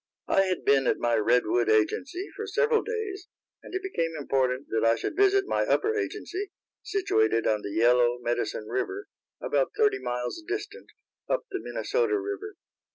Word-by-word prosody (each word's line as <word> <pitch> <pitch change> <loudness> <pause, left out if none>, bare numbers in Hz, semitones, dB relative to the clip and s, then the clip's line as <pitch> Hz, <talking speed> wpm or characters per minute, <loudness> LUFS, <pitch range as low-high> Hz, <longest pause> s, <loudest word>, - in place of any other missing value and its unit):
I 195 - +3
had 185 -1 -2
been 135 -2 +4
at - - +2
my 120 0 0
Redwood 115 +1 +2
agency 270 - +1
for 435 +2 -5
several 450 +1 +2
days, 430 -4 -4 0.3
and - - -9
it 380 - -2
became 165 - -2
important 135 -2 0
that 110 - 0
I 115 0 +4
should - - -4
visit 395 0 +4
my - - +1
upper 435 +1 +1
agency, 405 -1 -3 0.3
situated 115 - +1
on 105 -1 +1
the - - -5
Yellow 120 +3 +3
Medicine 120 -2 -2
river, 390 - -3 0.3
about - - 0
thirty 420 -3 +3
miles 125 - -3
distant, 415 +4 -5 0.4
up - - 0
the - - -2
Minnesota 455 -3 0
river. 405 +1 -5
360 Hz, 160 wpm, -27 LUFS, -, 0.4 s, been